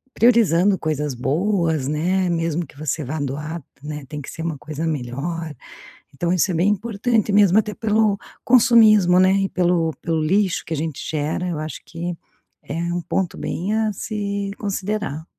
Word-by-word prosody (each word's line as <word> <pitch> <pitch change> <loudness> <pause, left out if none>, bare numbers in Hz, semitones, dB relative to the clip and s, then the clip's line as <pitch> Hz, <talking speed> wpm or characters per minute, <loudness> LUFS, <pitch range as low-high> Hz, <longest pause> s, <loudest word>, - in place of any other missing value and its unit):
priorizando 205 -5 +4
coisas 150 -2 -2
boas, 160 - 0
né, 180 +5 +1
mesmo 165 0 -1
que 145 - -19
você 155 +1 -2
vá 150 +4 -4
doar, 150 +4 -4 0.2
né, 150 -1 -6
tem 150 +2 -6
que 135 - -9
ser - - -7
uma 165 -2 -3
coisa 155 +5 -4
melhor. 150 +4 -3 0.6
Então 170 +5 -1
isso 185 +2 +2
é - - -2
bem 175 +5 +3
importante 215 +1 0
mesmo, 200 -1 +5
até 210 -1 +1
pelo 215 -2 +1 0.3
consumismo, 215 -7 +6
né, 185 +1 +5
e - - -3
pelo 175 -2 +1
pelo 165 -1 0
lixo 190 +3 +1
que 165 - -4
a - - -5
gente 155 -1 -3
gera. 155 +4 -2
Eu 170 - -2
acho 155 0 -6
que 170 +2 -5 0.5
é 145 - -6 0.2
um 175 - -1
ponto 180 +2 -2
bem 195 +5 -2
a 220 -1 +1
se 200 -1 -3
considerar. 200 -6 -3
175 Hz, 170 wpm, -21 LUFS, 155-200 Hz, 0.6 s, consumismo